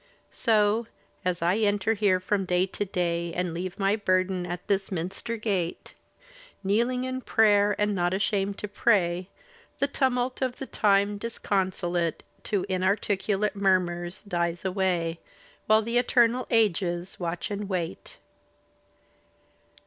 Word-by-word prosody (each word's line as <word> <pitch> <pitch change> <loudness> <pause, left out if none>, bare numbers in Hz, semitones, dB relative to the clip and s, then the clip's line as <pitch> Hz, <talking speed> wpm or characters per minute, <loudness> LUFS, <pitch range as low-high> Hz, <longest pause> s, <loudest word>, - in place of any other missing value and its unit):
So, 220 0 +2 0.4
as 180 -2 -1
I 175 +4 +2
enter 205 0 +2
here 200 -4 +2
from 195 +1 -1
day 180 0 +2
to 195 +2 -4
day. 170 -2 -1
And 180 -2 -1
leave 180 +2 -4
my 195 +1 +2
burden 185 -3 0
at 175 0 -5
this 195 -1 0
minster 185 +6 -3
gate. 195 -6 -2 0.7
Kneeling 235 +6 +1
in 255 0 -3
prayer, 205 -3 +4
and 210 0 +1
not 175 -2 +1
ashamed 200 +1 0
to 210 - -5
pray. 185 -4 +1 0.5
The - - +2
tumult 255 -2 0
of 255 -1 -1
the 270 - -5
time 200 -3 +2
disconsolate 185 -6 -1 0.2
To 200 -4 0
inarticulate 200 +2 0
murmurs 180 -3 0
dies 170 -1 -1
away. 180 -3 0 0.5
While 215 0 +5
the 235 +2 +1
eternal 245 0 +3
ages 185 -5 +1
watch 175 +3 -3
and 205 0 -4
wait. 175 -4 -4
195 Hz, 130 wpm, -27 LUFS, 180-215 Hz, 0.7 s, While